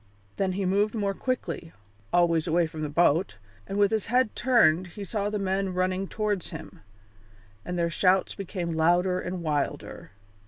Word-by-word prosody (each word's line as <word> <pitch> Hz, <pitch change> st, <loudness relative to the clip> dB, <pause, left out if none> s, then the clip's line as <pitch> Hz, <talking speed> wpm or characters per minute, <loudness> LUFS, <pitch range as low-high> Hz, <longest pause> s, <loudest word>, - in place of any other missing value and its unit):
Then 190 Hz, -1 st, 0 dB
he 195 Hz, +1 st, -2 dB
moved 205 Hz, +4 st, +1 dB
more 200 Hz, -2 st, 0 dB
quickly, 235 Hz, -8 st, -3 dB, 0.4 s
always 170 Hz, -1 st, +3 dB
away 170 Hz, +1 st, +3 dB
from 160 Hz, -1 st, -7 dB
the 150 Hz, -, -2 dB
boat, 160 Hz, -, +2 dB, 0.3 s
and 195 Hz, -, -4 dB
with 205 Hz, 0 st, +4 dB
his 220 Hz, -2 st, 0 dB
head 245 Hz, -1 st, +2 dB
turned 190 Hz, -9 st, +3 dB
he 200 Hz, +4 st, -8 dB
saw 205 Hz, +1 st, -2 dB
the 210 Hz, -, -2 dB
men 190 Hz, -1 st, -1 dB
running 185 Hz, +1 st, 0 dB
towards 210 Hz, -4 st, -2 dB
him, 160 Hz, -1 st, -9 dB, 0.8 s
and 180 Hz, -, -4 dB
their 170 Hz, -1 st, 0 dB
shouts 185 Hz, +1 st, +2 dB
became 180 Hz, -3 st, -4 dB
louder 175 Hz, +3 st, +2 dB
and 180 Hz, -1 st, -4 dB
wilder. 150 Hz, -3 st, -3 dB
185 Hz, 165 wpm, -27 LUFS, 170-200 Hz, 0.8 s, with